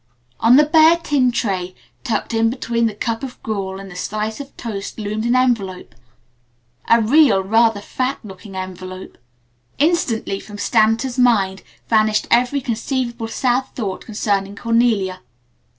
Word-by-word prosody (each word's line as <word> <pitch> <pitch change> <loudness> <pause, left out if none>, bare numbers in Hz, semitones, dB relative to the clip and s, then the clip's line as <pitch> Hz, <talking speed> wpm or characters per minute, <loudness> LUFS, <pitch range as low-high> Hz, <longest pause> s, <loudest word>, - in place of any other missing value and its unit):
On 230 +2 +5
the 300 +2 +6
bare 320 +2 +5
tin 285 -7 +1
tray, 185 -6 -2 0.3
tucked 235 -2 -2
in 225 0 +2
between 235 -1 -1
the 215 - -5
cup 225 +2 -3
of 265 -3 -7
gruel 195 -3 -3
and 195 0 -10
the - - -11
slice 215 +4 -3
of 280 -1 -10
toast 205 -4 -6
loomed 215 +1 -3
an 240 +1 +2
envelope 225 -8 0 1.0
a 230 - +6
real, 230 -3 +4
rather 225 +1 +2
fat 255 +5 -2
looking 195 -1 -11
envelope. 185 0 -8 0.6
Instantly 270 - 0
from 205 0 -11
Stanton's 225 +4 +1
mind 200 -6 +2 0.3
vanished 215 -1 +2
every 250 +4 +3
conceivable 235 -1 -3
sad 255 +2 0
thought 200 -6 -4
concerning 205 -2 -2
Cornelia. 225 -5 +1
225 Hz, 140 wpm, -19 LUFS, 200-245 Hz, 1.0 s, the